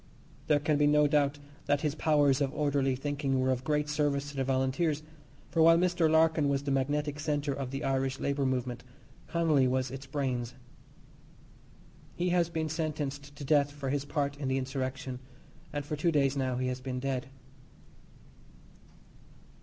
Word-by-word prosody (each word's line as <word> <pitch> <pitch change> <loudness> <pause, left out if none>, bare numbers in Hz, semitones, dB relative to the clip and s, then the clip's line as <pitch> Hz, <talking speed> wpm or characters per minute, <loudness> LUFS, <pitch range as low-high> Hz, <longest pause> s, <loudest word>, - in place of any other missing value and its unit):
There 150 -1 +4
can 150 0 +1
be 145 0 +4
no 150 0 +5
doubt 145 -1 +2 0.3
that 145 0 +2
his 150 -2 0
powers 145 -3 +3
of 135 -2 +1
orderly 140 -3 +1
thinking 140 0 -1
were 130 0 +2
of 130 0 -1
great 150 +1 0
service 145 -1 0
to - - -13
the 135 - +1
Volunteers, 135 +4 0 0.5
for 165 - +2
while 165 +1 +7
Mr. 175 -2 +2
Larkin 160 -2 +3
was 140 0 0
the 140 - -2
magnetic 145 +2 0
centre 145 -2 -1
of 135 -2 -4
the 135 +2 -4
Irish 135 0 0
labour 140 0 0
movement, 125 -2 -2 0.4
Connolly 155 -6 +2
was 130 0 0
its 135 +1 -8
brains. 130 -4 -2 1.6
He 180 +1 0
has 175 -1 +2
been 160 -2 -2
sentenced 145 -3 -4
to 145 - -8
death 145 0 +3
for 140 -2 -4
his 145 -1 0
part 145 -1 -1
in 140 -2 -4
the 130 0 +1
insurrection, 130 -1 -3 0.5
and 145 -1 -4
for 150 - -3
two 165 +3 +1
days 140 -3 +2
now 130 -2 -1
he 130 - -1
has 125 0 -4
been 130 -1 -4
dead. 130 -1 -2
145 Hz, 170 wpm, -30 LUFS, 135-150 Hz, 1.6 s, while